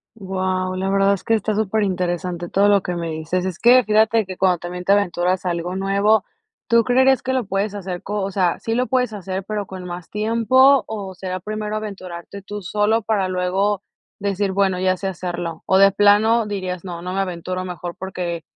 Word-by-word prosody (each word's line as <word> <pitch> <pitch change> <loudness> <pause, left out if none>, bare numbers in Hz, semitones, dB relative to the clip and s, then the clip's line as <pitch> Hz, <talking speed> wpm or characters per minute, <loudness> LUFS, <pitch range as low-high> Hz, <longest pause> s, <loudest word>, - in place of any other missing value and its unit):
Guau, 185 -2 -2
la 190 +1 -2
verdad 195 0 +3
es 195 - -4
que 225 - +2
está 215 0 -1
superinteresante 180 -4 -1
todo 200 +1 +3
lo 200 -2 +4
que 180 - -4
me 170 -1 -3
dices. 160 +4 -2
Es 185 -2 -4
que, 245 +1 +6
fíjate 220 +1 +3
que 185 -1 -8
cuando 185 -2 +3
también 180 +1 -6
te 195 - +1
aventuras 185 -2 +1
a 180 - +1
algo 175 +1 -3
nuevo, 200 +2 +2 0.4
¿tú 235 -1 +4
creerías 260 +1 +3
que 260 - -2
lo 255 -4 0
puedes 195 +2 -1
hacer 185 -3 -5
co 205 0 -3
o 195 - -3
sea, 180 -3 +1
sí 225 - -3
lo 250 +1 +1
puedes 250 -3 0
hacer, 190 -1 -4
pero 210 -1 -2
con 185 -1 -8
más 175 -1 -7
tiempo, 230 +6 +4
o 200 -3 -5
será 185 0 -4
primero 215 +2 -4
aventurarte 200 -3 -7
tú 205 +1 -7
solo 210 +4 +1
para 205 -3 0
luego 185 +2 0 0.4
decir: 200 0 -1
"Bueno, 190 -1 +1
ya 185 0 +1
sé 195 - -4
hacerlo", 175 -3 -5
o 190 - +4
de 195 0 +7
plano 210 +3 +4
dirías: 185 -3 -4
"No, 175 -2 -6
no 180 +1 -5
me 195 - -1
aventuro 185 0 -4
mejor 175 -1 -6
porque 175 -3 -4
195 Hz, 205 wpm, -21 LUFS, 180-210 Hz, 0.4 s, de